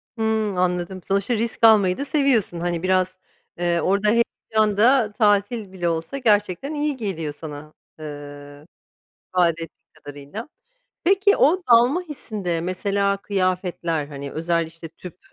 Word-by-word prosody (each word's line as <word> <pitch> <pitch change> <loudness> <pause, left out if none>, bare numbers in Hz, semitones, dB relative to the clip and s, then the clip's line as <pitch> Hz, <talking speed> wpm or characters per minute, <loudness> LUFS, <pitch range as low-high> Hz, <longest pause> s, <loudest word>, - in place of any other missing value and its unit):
Hımm, 220 -3 -1
anladım, 180 +1 -1
sonuçta 200 +4 0
risk 230 0 +1
almayı 200 -5 +5
da 280 - -3
seviyorsun. 270 - +1
Hani, 175 0 -2
biraz, 185 0 +1 0.4
eee, 175 -1 +1
orada 200 +2 +1
heyecan 215 -2 +1
da 230 0 +4
tatil 205 -1 +1
bile 175 -2 -2
olsa 165 +10 -3
gerçekten 210 - +1
iyi 295 -2 -1
geliyor 165 - -4
sana, 150 0 -9 0.3
ııı, 145 -1 -9 0.6
ifade 180 -2 +3
ettiğin 165 - -5 0.2
kadarıyla. 145 - -9 0.6
Peki 395 +3 +4
o 360 +6 +3
dalma 245 +9 +5
hissinde 210 - -4
mesela 200 +3 0
kıyafetler, 185 -5 -1
hani, 140 -1 -7
özel, 165 +1 0
işte, 165 0 -10
tüp, 175 +2 -12
190 Hz, 135 wpm, -22 LUFS, 170-225 Hz, 0.6 s, almayı